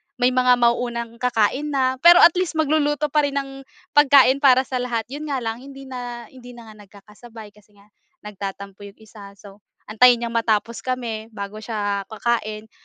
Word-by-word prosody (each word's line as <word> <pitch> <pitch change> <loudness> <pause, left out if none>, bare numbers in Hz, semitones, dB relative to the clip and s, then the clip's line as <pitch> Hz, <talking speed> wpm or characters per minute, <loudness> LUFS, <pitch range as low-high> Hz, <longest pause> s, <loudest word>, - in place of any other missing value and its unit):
may 250 0 +1
mga 250 0 +3
mauunang 235 -1 -1
kakain 250 +5 -1
na, 260 -1 0
pero 345 +3 +7
at 340 - +8
least, 365 -3 -3
magluluto 300 -1 0
pa 300 -1 +2
rin 280 - -7
ng 270 -1 -6 0.2
pagkain 275 -2 +5
para 260 -2 +4
sa 260 -1 -4
lahat, 240 -2 -3
'yon 300 +2 -7
nga 270 -4 -3
lang 225 +1 -4
hindi 275 +1 -12
na 245 -2 -8
hindi 245 -1 -14
na 230 -2 -13
nga 215 - -18
nagkakasabay 210 +2 -15
kasi 210 0 -25
nga 200 - -22 0.4
nagtatampo 200 -1 -8
'yong 200 0 -12
isa. 205 -2 -15
So, 200 0 -16 0.2
antayin 240 +2 +3
niyang 230 - -4
matapos 230 0 -1
kami 235 -4 -5
bago 200 +1 -7
siya 205 -3 -4
kakain. 220 -1 -3
240 Hz, 180 wpm, -21 LUFS, 215-265 Hz, 0.4 s, at